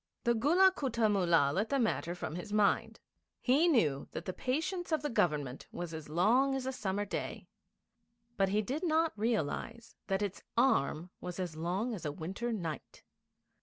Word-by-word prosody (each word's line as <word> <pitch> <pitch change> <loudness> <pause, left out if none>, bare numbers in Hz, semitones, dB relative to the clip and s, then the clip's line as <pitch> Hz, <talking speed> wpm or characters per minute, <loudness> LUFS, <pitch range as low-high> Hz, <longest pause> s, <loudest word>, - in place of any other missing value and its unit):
The 235 - +3
Gulla 335 +12 +5
Kutta 235 -5 +1
Mullah 170 -7 +3
let 210 +7 0
the 280 - +1
matter 215 -8 0
from 175 - -5
his 180 +5 -6
mind. 210 -1 +2 0.4
He 280 +7 +3
knew 155 - +2
that - - -5
the 185 - -3
patience 325 - -2
of 315 - +1
the 295 - -1
Government 145 - 0
was 175 -1 -5
as 160 -2 -7
long 235 - +3
as 265 -1 -3
a 265 - -1
summer 205 -4 -2
day; - - -4 0.9
but 195 -1 +2
he 210 +2 +1
did 275 - -3
not 325 -1 +2
realise 225 +1 -2
that 195 +1 0
its 200 -2 -4 0.2
arm 180 - +2
was 180 0 -6
as 175 -4 -3
long 185 +9 -1
as 200 - -6
a 150 - -2
winter 190 +10 -4
night. 170 -9 -5
210 Hz, 175 wpm, -32 LUFS, 175-255 Hz, 0.9 s, Gulla